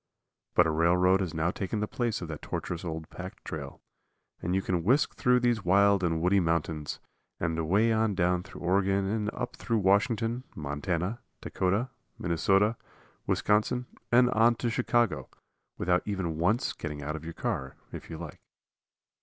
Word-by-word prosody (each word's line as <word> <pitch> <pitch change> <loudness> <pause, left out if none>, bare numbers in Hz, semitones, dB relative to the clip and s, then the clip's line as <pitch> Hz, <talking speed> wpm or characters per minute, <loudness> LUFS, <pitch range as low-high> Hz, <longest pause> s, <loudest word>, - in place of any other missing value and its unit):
But 90 - +6
a 80 - +1
railroad 90 +4 +4
has 85 -3 -3
now 80 +2 +1
taken 100 +3 -3
the 105 - -1
place 120 -5 -2
of - - -5
that 80 -1 -6
tortuous 90 0 -4
old 80 -2 -5
packtrail, 90 0 -7 0.6
and 90 +2 -1
you 95 - +2
can 90 -3 -1
whisk 130 - +3
through 125 0 +3
these 120 -3 +1
wild 100 +2 +4
and 80 -2 +1
woody 95 +3 +4
mountains, 80 -3 -1 0.4
and 80 -1 -1
away 100 +8 +3
on 110 -2 +1
down 90 -1 +2
through 95 - -12
Oregon 95 +2 +2
and 105 +1 -1
up 125 0 -5
through 115 - 0
Washington, 115 +4 +2
Montana, 85 +8 -2 0.2
Dakota, 100 +8 -1 0.3
Minnesota, 95 +6 +2 0.5
Wisconsin 110 +4 +1 0.3
and 125 +1 +5
on 115 +2 +4
to 120 0 -2
Chicago 115 - +1 0.5
without 90 0 +2
even 90 -6 -2
once 110 +10 +1
getting 75 -1 -6
out 75 +2 -3
of 80 - -7
your 85 0 -7
car, 65 0 -3 0.2
if - - -8
you 80 - -6
like. 80 -2 -8
95 Hz, 160 wpm, -29 LUFS, 85-110 Hz, 0.6 s, But